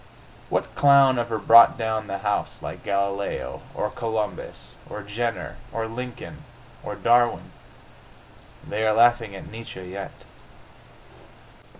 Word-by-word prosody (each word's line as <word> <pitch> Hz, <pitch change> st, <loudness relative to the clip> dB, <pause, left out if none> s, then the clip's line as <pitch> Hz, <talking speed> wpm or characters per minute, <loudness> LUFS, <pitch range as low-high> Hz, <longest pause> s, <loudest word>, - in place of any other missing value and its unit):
What -, -, -2 dB
clown 140 Hz, -3 st, +5 dB
ever 115 Hz, -1 st, -2 dB
brought 115 Hz, +4 st, +7 dB
down 110 Hz, -2 st, -2 dB
the 100 Hz, -, -3 dB
house 105 Hz, +1 st, -2 dB
like -, -, -7 dB
Galileo? 100 Hz, 0 st, -2 dB
Or 105 Hz, -, -2 dB
Columbus? 105 Hz, -, -4 dB
Or 105 Hz, -, -7 dB
Jenner? 105 Hz, -, -4 dB
Or 115 Hz, -1 st, -3 dB
Lincoln? 125 Hz, +2 st, -8 dB, 0.4 s
Or 105 Hz, -, -5 dB
Darwin?... 120 Hz, +4 st, +2 dB, 1.2 s
They 110 Hz, -, -2 dB
are 110 Hz, -, +3 dB
laughing 115 Hz, -2 st, +3 dB
at 95 Hz, -, -9 dB
Nietzsche 110 Hz, -4 st, -9 dB
yet.... 95 Hz, +2 st, -8 dB
110 Hz, 115 wpm, -24 LUFS, 100-120 Hz, 1.2 s, brought